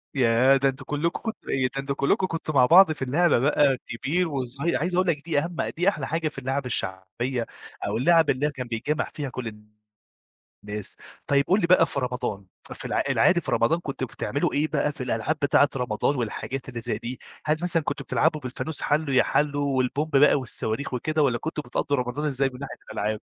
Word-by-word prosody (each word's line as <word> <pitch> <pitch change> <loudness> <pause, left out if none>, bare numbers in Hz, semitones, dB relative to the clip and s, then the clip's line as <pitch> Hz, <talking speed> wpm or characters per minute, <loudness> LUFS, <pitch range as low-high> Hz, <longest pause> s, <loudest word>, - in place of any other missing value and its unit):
ياه! 130 +1 +4
ده 135 0 +2
أنتم 135 0 -7
كلكم 150 +4 -1
كنتم 225 - -6
إيه؟ 130 -1 +1
ده - - -11
أنتم 135 0 -2
كلكم 140 +7 +1
كنتم 165 -2 -4
مع 130 -3 +6
بعض 175 +5 +7
في 155 - -6
اللعبة 145 +4 +3
بقى 140 0 +3
كبير 150 +10 -1
وصغير، 140 +3 -2
عايز 175 +2 -1
أقول 185 +1 +2
لك 150 -3 -1
دي 160 -4 +2
أهم 170 +4 -4 0.2
دي 180 +3 +4
أحلى 150 -9 -4
حاجة 165 0 -1
في 150 - -7
اللعب 135 +1 -2
الشعبية، 115 +3 -2 0.4
أو 105 +2 -1
اللعب 165 +4 +4
اللي 135 +3 +1
هي 150 - 0
كان 130 -3 -6
بيتجمع 120 +7 -1
فيها 145 -3 -4
كل 130 -2 -5 1.2
الناس، 105 -1 -5 0.3
طيب 140 0 +3
قل 190 +4 +4
لي 170 - +1
بقى 175 -2 +6
في 145 - -3
رمضان 125 -6 -3 0.3
في - - -7
العا - - 0
العادي 175 -1 +4
في - - -5
رمضان 115 +9 +2
كنتم 140 -5 -4
بتعملوا 135 +3 -2
إيه 150 +2 +1
بقى 150 -1 0
في 145 - -10
الألعاب 120 +5 -1
بتاعة 140 0 +4
رمضان 125 +2 0
والحاجات 130 +2 -4
اللي 120 -2 -6
زي 115 -3 -2
دي، 120 +3 -6 0.3
هل 155 +1 +2
مثلًا 175 -2 +1
كنتم - - -3
بتلعبوا 155 -1 +1
بالفانوس 140 +4 -4
حالو 150 -1 0
يا 130 - +5
حالو 145 -1 0
والبومب 140 +5 0
بقى 145 +2 +6
والصواريخ 130 -1 -1
وكده، 155 +5 0
والّا 125 -4 +2
كنتم 155 +3 -4
بتقضوا 140 +3 -1
رمضان 125 +4 -2
إزاي 135 -2 +1
من 125 - -10
ناحية 135 -3 -6 0.2
الألعاب؟ 105 +1 -2
140 Hz, 205 wpm, -25 LUFS, 125-155 Hz, 1.2 s, بعض